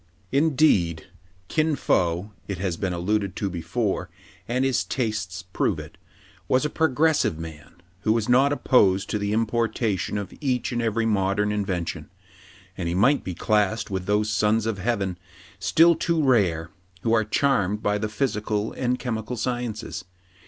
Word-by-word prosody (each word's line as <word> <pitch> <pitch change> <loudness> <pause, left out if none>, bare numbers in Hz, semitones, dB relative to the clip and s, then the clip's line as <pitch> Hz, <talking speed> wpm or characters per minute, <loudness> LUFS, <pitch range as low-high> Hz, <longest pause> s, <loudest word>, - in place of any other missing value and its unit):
Indeed, 135 - +2 0.4
Kin 155 -1 +1
Fo 90 -4 0
— - - -34
it 95 - -3
has 90 -1 -2
been 95 +2 -2
alluded 95 +2 -1
to 100 -2 -2
before, 95 +1 -2 0.4
and 130 +3 +1
his 135 -2 +1
tastes 105 -6 -3
prove 90 - -1
it - - -9 0.3
— - - -28
was 130 +3 +2
a 150 - -1
progressive 160 - +2
man, 80 -2 -9 0.2
who 110 - +1
was 110 -1 +1
not 130 +3 +4
opposed 100 -9 +3
to 105 - 0
the 100 0 -1
importation 110 -3 0
of 100 -2 -5
each 130 -4 0
and 120 -1 -1
every 115 0 0
modern 105 -1 +1
invention; 90 -6 -3 0.7
and 85 -3 -3
he 85 - -1
might 135 +10 +3
be 90 - -5
classed 105 +2 +1
with 95 -1 -3
those 105 +1 +1
Sons 105 +2 +2
of 110 -3 -2
Heaven, 100 -4 -1 0.4
still 170 +1 +5
too 165 -1 0
rare, 90 - +2 0.3
who 115 - +2
are 110 -1 +4
charmed 105 -3 +1
by 105 0 +1
the 105 0 -2
physical 110 -2 -1
and 125 0 0
chemical 115 -1 -3
sci 120 +2 -1
ences. 110 -4 -6
105 Hz, 165 wpm, -25 LUFS, 95-125 Hz, 0.7 s, still